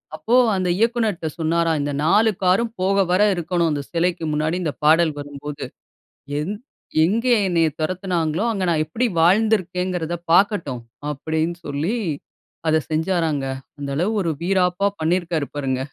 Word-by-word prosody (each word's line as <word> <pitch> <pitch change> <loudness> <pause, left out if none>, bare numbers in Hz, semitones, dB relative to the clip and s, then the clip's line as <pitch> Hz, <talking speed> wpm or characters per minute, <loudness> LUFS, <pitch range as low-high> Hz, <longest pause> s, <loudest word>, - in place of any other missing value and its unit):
அப்போ, 235 - 0 0.2
அந்த 185 -1 0
இயக்குனர்ட்ட 225 -6 0
சொன்னாராம், 165 0 +1
"இந்த 145 - -2
4 215 +6 +4
காரரும் 195 +6 +2
போக 195 +1 +2
வர 185 - +3
இருக்கணும். 170 0 0
அந்த 145 -1 -1
சிலைக்கு 170 0 0
முன்னாடி 155 +3 0
இந்த 155 - 0
பாடல் 160 +1 +5
வரும்போது. 145 0 -7 0.8
எந் 185 +8 -3 0.5
எங்க 225 +8 +1 0.2
என்னைய 170 -3 +2
தொரத்துனாங்களோ! 175 0 -1
அங்க 195 -4 -2
நான் 155 -2 +2
எப்பிடி 220 +11 -1
வாழ்ந்திருக்கேங்கிறத 180 -3 +1 0.2
பாக்கட்டும்." 170 - +2 0.3
அப்பிடீன்னு 160 +4 -2
சொல்லி 150 +10 -1 0.7
அத 155 - +4
செஞ்சாராங்க. 160 -3 0 0.3
அந்தளவு 145 +9 -1
1 170 - -1
வீராப்பா 185 +1 +1
பண்ணியிருக்காரு 165 -2 0
பாருங்க 130 -2 -1
170 Hz, 130 wpm, -22 LUFS, 155-185 Hz, 0.8 s, பாடல்